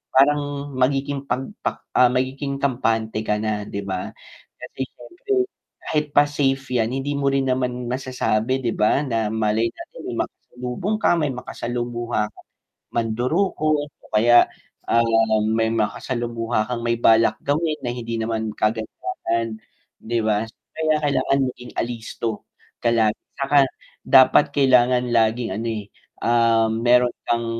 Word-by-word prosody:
parang 145 +2 +4 0.3
magiging 135 +2 0
'pag 135 -1 -2 0.2
pak - - -3
ah, 125 -1 +6
magiging 135 +2 -2
kampante 110 -5 0
ka 105 -1 0
na 105 -1 -2
'di 100 - -5
ba? 95 -2 -4 0.5
Kasi - - -10
siyempre, 350 - -8 0.5
kahit 150 -1 -1
pa 145 - +6
safe 135 -2 0
yan 115 0 +1
hindi 135 +2 -2
mo 140 -1 +1
rin 135 -1 +1
naman 125 -1 -1
masasabi 130 -1 -1
'di 120 -3 -2
ba 105 +6 +3
na 115 -6 -1
malay 110 0 +1
natin - - -11
may - - -4
makasalubong 125 - -4
ka - - +3
may 150 -4 0
makasalumuha 120 -2 -3
kang - - -19 0.4
mandurukot 145 - 0 0.2
o - - -16
kaya, 120 +3 +6 0.5
ah, 115 - +5 0.4
may 110 0 +1
makasalumuha 115 0 -1
kang 120 -1 -3
may 115 0 0
balak 115 -1 +4
gawin 155 +2 -1
na 120 -1 -4
hindi 115 -1 -4
naman 110 -1 -2
kagandahan 115 - -2 0.5
'di 115 +1 -1
ba? 105 0 +2 0.3
Kaya 160 -1 +1
kailangan 135 0 +2
maging 125 0 -12
alisto, 115 -2 -4 0.4
ka 120 - +3
lagi 110 -2 +3 0.2
'saka 140 0 +4 0.4
dapat 130 +2 +6
kailangan 125 -2 +4
laging 115 -1 +2
ano, 115 +2 -3
eh, 105 -2 -4 0.4
ah, 115 -1 +3
mayro'n 120 +2 +3 0.2
kang 115 0 +1
120 Hz, 140 wpm, -22 LUFS, 115-135 Hz, 0.5 s, ah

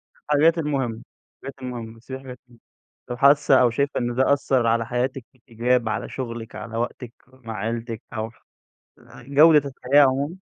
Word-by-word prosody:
الحاجات 155 +3 +2
المهمة، 135 -7 -2 0.4
الحاجات 135 - -7
المهمة 120 -3 -6
بتسيبي 130 +3 -9
حاجات 125 -2 -10
المه 120 -1 -20 0.5
طب 120 - -4
حاسة 140 0 +5
أو 125 - +5
شايفة 140 +5 -1
إن 120 -1 -2
ده 130 +2 +3
أثر 130 -4 +1
على 115 0 +1
حياتِك 125 +2 -2
في - - -29
الإيجاب، 120 0 0
على 105 - -3
شغلِك، 115 -3 -6
على 115 0 -6
وقتِك 120 0 -4
مع 125 -4 -9
عيلتِك 115 +2 -4
أو 110 0 -3
ح - - -27 0.9
جودة 145 0 +5
الحياة 140 +3 +4
عمومًا؟ 140 +6 -2
125 Hz, 165 wpm, -23 LUFS, 115-140 Hz, 0.9 s, حاسة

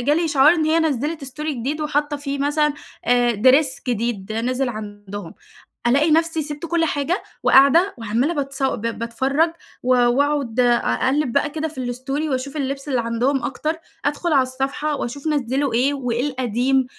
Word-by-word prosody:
جه 285 +5 +2
لي 335 +2 +1
إشعار 295 -1 +5
إن 315 - 0
هي 315 +1 +3
نزّلت 300 0 -1
استوري 295 +3 -4
جديد 275 +6 -3
وحاطّة 295 0 -1
فيه 280 0 -4
مثلًا 295 +1 +1 0.3
آآ، 245 0 +3
Dress 260 +5 +3
جديد 230 -4 -2
نزل 250 +4 -1
عندهم، 205 -4 -7 0.5
ألاقي 290 +6 +3
نفسي 325 0 +2
سِبت 295 +2 -5
كل 335 0 +1
حاجة، 300 +6 -1 0.2
وقاعدة 325 +9 +5
وعمّالة 230 +8 0
باتص 275 -2 -3
ب 265 -5 0
باتفرّج 260 +7 0 0.3
و 250 - -2
وأقعد 255 0 +1
أقلِّب 250 +3 +2
بقى 285 +1 +2
كده 315 +1 -3
في 305 - -12
الستوري 260 +4 -3
وأشوف 270 +2 -3
اللِبس 275 0 -3
اللي 255 -3 +1
عندهم 240 +4 0
أكتر، 305 +4 -2 0.3
أدخل 300 +3 0
على 275 - +5
الصفحة 270 +4 -2
وأشوف 280 +5 -5
نزّلوا 275 -2 0
إيه 265 +5 +2
وإيه 250 0 -1
القديم، 255 +1 +1
275 Hz, 160 wpm, -21 LUFS, 245-300 Hz, 0.5 s, إشعار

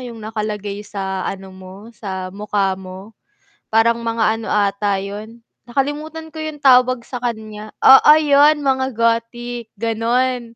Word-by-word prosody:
'yung 245 -2 -8
nakalagay 210 -2 -4
sa 195 -2 -5
ano 190 -1 -7
mo, 190 +4 -12
sa 190 -4 -6
mukha 200 -1 -1
mo, 190 +3 -11 0.6
parang 230 +1 +2
mga 225 -1 +1
ano 220 - -5
ata 200 -1 +1
'yun, 210 +4 -8 0.2
nakalimutan 295 +5 -3
ko 315 - -5
'yung 310 -1 -6
tawag 255 -2 +5
sa 250 -1 -7
kanya, 215 -2 -5
oo 265 +3 +8
'yun, 295 0 +4
mga 265 -2 0
Gothic 230 0 -2
ganon. 235 +3 0
230 Hz, 135 wpm, -19 LUFS, 205-255 Hz, 0.6 s, oo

